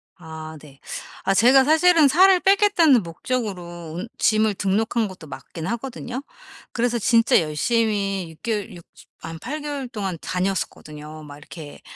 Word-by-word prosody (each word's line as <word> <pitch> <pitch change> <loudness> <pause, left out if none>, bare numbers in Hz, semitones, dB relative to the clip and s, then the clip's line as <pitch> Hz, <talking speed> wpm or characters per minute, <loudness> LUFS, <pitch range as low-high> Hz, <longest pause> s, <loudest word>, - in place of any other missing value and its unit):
아 160 -2 -9
네. 140 -3 -16 0.5
아 195 - +3
제가 250 +6 +6
사실은 320 +1 +5
'살을 370 +6 +5
빼겠다.'는 385 - +4
목적으로 175 -3 -5
운 190 +6 -5
짐을 215 -1 +2
등록한 215 +4 0
것도 185 -4 -12
맞긴 155 +4 -8
하거든요. 245 +3 -5 0.5
그래서 240 0 0
진짜 230 -1 +4
열심히 195 +3 -1
6 160 - -19
개월 215 -3 -3
6 170 - -12 0.4
한 160 0 -8
8 300 - -5
개월 290 -3 -4
동안 200 -6 -4
다녔었거든요. 155 -5 -4
막 145 -1 -11
이렇게 150 0 -11
205 Hz, 285 characters per minute, -22 LUFS, 165-250 Hz, 0.5 s, 제가